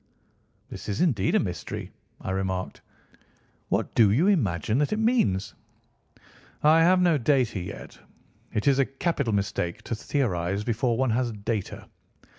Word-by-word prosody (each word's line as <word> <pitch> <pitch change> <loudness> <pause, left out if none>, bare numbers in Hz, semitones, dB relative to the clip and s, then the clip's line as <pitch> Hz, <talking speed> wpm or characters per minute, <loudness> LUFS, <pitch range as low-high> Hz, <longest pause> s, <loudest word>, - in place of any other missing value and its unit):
"This - - -7
is 100 - -2
indeed 110 - +2
a - - +5
mystery," 90 -5 -5 0.3
I - - -5
remarked. 95 -1 -3 0.9
"What - - -1
do 110 -3 +5
you 130 - +3
imagine 110 - +1
that 145 - +1
it - - -1
means?" 220 - +1 1.1
"I 155 +2 +6
have 180 +3 +5
no 175 -4 +3
data 125 -5 +1
yet. 90 - -8 0.5
It 105 - -2
is 140 -1 +4
a 135 - +4
capital 135 -2 -1
mistake 95 -4 -2
to - - -4
theorise 100 - -1
before 120 +1 0
one 130 -1 +1
has 120 +1 0
data. 105 -1 -4
115 Hz, 145 wpm, -26 LUFS, 100-145 Hz, 1.1 s, I